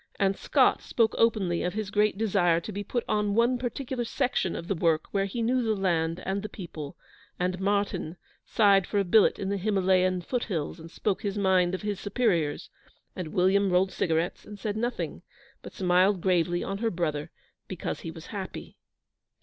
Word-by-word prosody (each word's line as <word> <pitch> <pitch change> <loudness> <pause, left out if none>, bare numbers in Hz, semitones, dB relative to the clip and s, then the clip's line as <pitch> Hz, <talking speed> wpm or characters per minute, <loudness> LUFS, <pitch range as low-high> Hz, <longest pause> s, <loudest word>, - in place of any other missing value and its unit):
And 195 -1 +2
Scott - - +3
spoke 225 -2 +1
openly 200 -7 +2
of 180 +2 -2
his 215 -2 -3
great 210 -1 +2
desire 190 -6 +2
to 170 - -7
be 205 0 -4
put 240 +4 -2
on 210 -1 0
one 240 +2 +3
particular 250 0 -3
section 240 -7 -1
of 170 - -6
the 195 - +1
work 165 -3 +1
where 195 -1 +1
he 230 +4 -3
knew 250 +2 +2
the 220 -2 +1
land 170 -4 0
and 195 +1 -1
the 215 - -6
people, 160 -7 -8 0.4
and 180 0 -1
Martyn 195 -4 -1 0.3
sighed 200 -3 +4
for 205 - -2
a 200 - +3
billet 200 +3 +4
in 195 - -3
the 200 - 0
Himalayan 185 -2 +2
foot 245 +7 -2
hills, 165 -4 -3
and 165 +1 -10
spoke 200 +3 -2
his 205 -2 -3
mind 185 -2 +3
of 185 - -7
his 205 -2 -2
superiors, 195 -9 0 0.4
and 180 - -4
William 190 +4 +2
rolled 185 +1 +2
cigarettes 165 +1 -1
and 210 - -10
said 205 +1 -3
nothing, 240 +3 -3 0.4
but - - -9
smiled 185 +1 +3
gravely 175 -1 +1
on 195 0 -4
her 225 0 +1
brother 155 -6 -2 0.4
because - - -4
he - - -6
was - - -9
happy. - - -7
195 Hz, 190 wpm, -27 LUFS, 180-210 Hz, 0.4 s, sighed